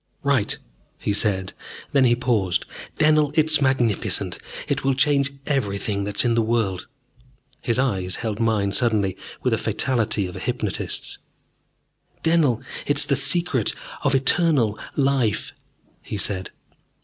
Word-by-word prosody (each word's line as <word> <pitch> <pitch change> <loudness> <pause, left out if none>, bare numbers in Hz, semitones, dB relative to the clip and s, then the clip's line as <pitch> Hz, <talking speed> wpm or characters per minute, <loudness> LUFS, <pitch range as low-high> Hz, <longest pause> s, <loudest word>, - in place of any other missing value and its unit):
"Right," 140 -7 +1 0.4
he 100 - -2
said. 100 -2 0 0.4
Then 135 -2 +4
he 120 -1 +4
paused. 115 -8 0 0.3
"Dennell, 150 -1 +3
it's 155 -1 +3
magnificent! 125 -6 0 0.3
It - - -1
will 135 -1 +1
change 140 0 +2
everything 100 -6 -1
that 100 0 -5
is - - +6
in 120 - +2
the 115 - +2
world." 110 -5 -1 0.7
His 120 -2 0
eyes 95 -9 0
held 110 -2 -4
mine 110 -3 +1
suddenly 105 -5 +2 0.3
with - - +1
the - - +1
fatality 110 -6 0
of 90 - -7
a - - -6
hypnotist's. - - -3 1.0
"Dennell, 160 -8 +2 0.2
it 145 - +1
is 145 - +7
the 140 - +1
Secret 135 - +3 0.3
of 140 -1 +2
Eternal 135 -5 +2 0.2
Life," 135 -6 0 0.5
he 105 - -6
said. 95 -2 -1
120 Hz, 135 wpm, -23 LUFS, 105-140 Hz, 1.0 s, is